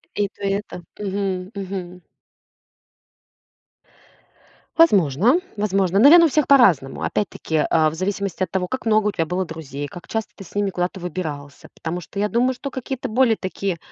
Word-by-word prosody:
И 205 - +1
то, 205 - -15
и 195 - +1
это. 190 -3 -4 0.2
Мгм, 195 -2 -3
мгм. 185 -2 -6 2.8
Возможно 210 - +4 0.2
возможно. 195 -2 +1
Наверно, 335 +7 +8
у - - +5
всех 300 -1 +1
по-разному. 190 - +4
Опять-таки, 160 -5 -1
а, 155 -1 +3
в 155 - -8
зависимости 190 +1 -2
от - - -4
того, 180 -1 -1
как 260 +1 -5
много 215 -1 +3
у - - +1
тебя 165 -4 -1
было 180 +3 -2
друзей, 145 -3 -6
как 175 +5 -12
часто 220 -1 -3
ты 195 - -10
с 185 - -16
ними 205 -1 +1
куда-то 180 +1 -3
выбирался. 150 -5 -6
Потому 170 +2 -4
что 200 +4 -8
я 210 0 +1
думаю, 250 +3 +2
что 275 +2 -7
какие-то 260 -1 -5
более 235 -1 +3
такие, 190 -1 -3
195 Hz, 170 wpm, -22 LUFS, 175-215 Hz, 2.8 s, Наверно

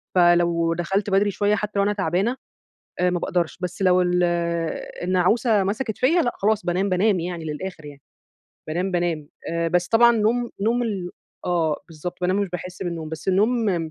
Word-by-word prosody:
فلو 175 -1 +4
دخلت 195 +4 -1
بدري 200 +1 +3
شوية 205 +2 +1
حتى 210 0 -3
لو - - +4
أنا 205 +1 +1
تعبانة 195 +5 0 0.7
آآ 180 0 +3
ما 180 - 0
باقدرش، 175 -2 -1
بس 180 +1 -4
لو 185 -1 +4
ال 180 0 +1 0.8
النعوسة 190 +4 +2
مسكت 220 +3 -2
فيَّ 255 - +3 0.2
لأ، 240 - +1
خلاص 210 0 +1
بانام، 180 +3 +1
بانام 190 +1 +2
يعني 170 -1 -5
للآخر 160 +1 -6
يعني. 145 -2 -11 0.7
بانام، 180 +4 -1
بانام. 170 -4 -1 0.2
آآ 170 0 0
بس 175 +1 +1
طبعًا 235 +1 +6
نوم 235 +3 +1
نوم 230 +4 +1
ال 195 -6 -3 0.3
آه 165 -4 +1
بالضبط 170 +2 -7
بانام 185 +2 +1
مش 200 -2 0
باحس 180 +1 -6
بالنوم 170 -3 -4
بس 160 +4 -6
النوم 195 -4 +1
180 Hz, 175 wpm, -23 LUFS, 175-205 Hz, 0.8 s, طبعًا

